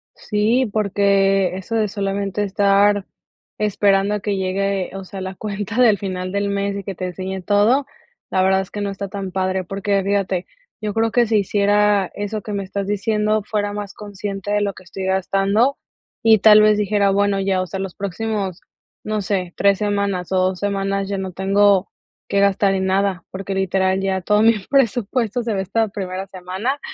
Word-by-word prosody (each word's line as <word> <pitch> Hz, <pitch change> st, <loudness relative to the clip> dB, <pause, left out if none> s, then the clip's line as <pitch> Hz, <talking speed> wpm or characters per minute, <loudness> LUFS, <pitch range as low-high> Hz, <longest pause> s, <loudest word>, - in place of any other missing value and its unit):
Sí, 220 Hz, +4 st, +1 dB
porque 195 Hz, -2 st, +2 dB
eso 210 Hz, +4 st, -5 dB
de 220 Hz, -1 st, +2 dB
solamente 200 Hz, 0 st, -2 dB
estar 200 Hz, 0 st, +3 dB, 0.5 s
esperando 205 Hz, -1 st, +2 dB
a -, -, -2 dB
que 205 Hz, 0 st, -2 dB
llegue, 195 Hz, 0 st, -1 dB
o 195 Hz, -, -6 dB
sea, 190 Hz, +1 st, -8 dB
la 190 Hz, 0 st, -5 dB
cuenta 210 Hz, +2 st, -5 dB
del 220 Hz, -4 st, +5 dB
final 185 Hz, -1 st, -4 dB
del 200 Hz, +1 st, -1 dB
mes 200 Hz, 0 st, -1 dB
y 200 Hz, -, -5 dB
que 195 Hz, 0 st, -6 dB
te 185 Hz, -, -4 dB
enseñe 185 Hz, +1 st, -5 dB
todo, 210 Hz, +9 st, +3 dB, 0.5 s
la 185 Hz, -, +2 dB
verdad 190 Hz, 0 st, +3 dB
es 190 Hz, -, -9 dB
que 205 Hz, -, -5 dB
no 200 Hz, -, -1 dB
está 200 Hz, 0 st, -5 dB
tan 195 Hz, -1 st, -5 dB
padre. 190 Hz, 0 st, -1 dB
Porque 195 Hz, +2 st, -1 dB
fíjate, 195 Hz, -2 st, 0 dB, 0.4 s
yo 210 Hz, -1 st, -2 dB
creo 225 Hz, +1 st, +1 dB
que 240 Hz, 0 st, +3 dB
si 220 Hz, 0 st, +2 dB
hiciera 205 Hz, 0 st, +2 dB
eso 205 Hz, +1 st, -4 dB
que 210 Hz, -, -6 dB
me 200 Hz, -1 st, -2 dB
estás 195 Hz, +1 st, -4 dB
diciendo, 210 Hz, +1 st, 0 dB
fuera 205 Hz, -1 st, -2 dB
más 205 Hz, -1 st, -6 dB
consciente 205 Hz, -1 st, -6 dB
de 205 Hz, 0 st, +2 dB
lo 200 Hz, -1 st, -1 dB
que 185 Hz, -, -14 dB
estoy 190 Hz, +1 st, -6 dB
gastando 195 Hz, +7 st, +1 dB, 0.5 s
y 220 Hz, -1 st, +6 dB
tal 215 Hz, +1 st, +7 dB
vez 215 Hz, 0 st, +5 dB
dijera: 205 Hz, -1 st, +2 dB
"Bueno 200 Hz, 0 st, +2 dB
ya". 190 Hz, -1 st, +1 dB
O 185 Hz, -, -3 dB
sea, 195 Hz, -, -5 dB
los 190 Hz, -2 st, -5 dB
próximos, 200 Hz, -1 st, -3 dB, 0.4 s
no 215 Hz, 0 st, -2 dB
sé, 185 Hz, -3 st, -2 dB
3 200 Hz, -1 st, +3 dB
semanas 200 Hz, -3 st, -1 dB
o 190 Hz, -, +2 dB
2 185 Hz, 0 st, +1 dB
semanas 195 Hz, -1 st, -1 dB
ya 200 Hz, 0 st, -2 dB
no 190 Hz, -1 st, -4 dB
tengo 195 Hz, +1 st, +3 dB, 0.4 s
que 200 Hz, -, +1 dB
gastar 200 Hz, 0 st, +3 dB
en 190 Hz, 0 st, -1 dB
nada, 190 Hz, -2 st, 0 dB
porque 195 Hz, +1 st, -5 dB
literal 190 Hz, 0 st, +1 dB
ya 190 Hz, -1 st, -1 dB
todo 210 Hz, +3 st, +2 dB
mi 225 Hz, +1 st, +6 dB, 0.2 s
presupuesto 245 Hz, -2 st, +1 dB
se 230 Hz, -1 st, -1 dB
va 195 Hz, -, -1 dB
esta 220 Hz, +4 st, 0 dB
primera 190 Hz, -1 st, -5 dB
semana. 190 Hz, +9 st, -3 dB
200 Hz, 190 wpm, -20 LUFS, 190-210 Hz, 0.5 s, tal